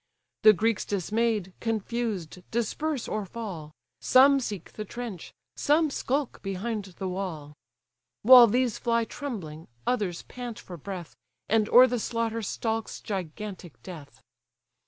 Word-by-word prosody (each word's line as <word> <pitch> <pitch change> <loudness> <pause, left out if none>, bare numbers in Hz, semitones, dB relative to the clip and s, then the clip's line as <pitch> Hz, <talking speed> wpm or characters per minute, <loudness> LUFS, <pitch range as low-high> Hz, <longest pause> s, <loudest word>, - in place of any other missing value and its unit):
The 215 - +8
Greeks 225 +3 +1
dismay'd, 205 0 -1
confused, 220 -6 -3
disperse 255 +5 -2
or 215 -1 -2
fall, 190 -7 -7 0.3
Some 275 +2 +6
seek 205 -8 -6
the 215 - -5
trench, 220 -4 -7 0.2
some 305 +1 +2
skulk 275 0 -2
behind 200 +2 -3
the 190 - -3
wall. 180 -6 -5 0.7
While 245 +1 +10
these 245 +1 +1
fly 235 -1 +1
trembling, 180 - -7 0.2
others 205 -8 -1
pant 245 -2 -7
for 180 - -9
breath, 175 0 -7 0.3
And 215 0 +2
o'er 250 +2 +9
the 245 -1 -1
slaughter 230 0 -2
stalks 225 +1 -3
gigantic 190 -2 -6
death. 160 -6 -11
215 Hz, 125 wpm, -27 LUFS, 185-235 Hz, 0.7 s, While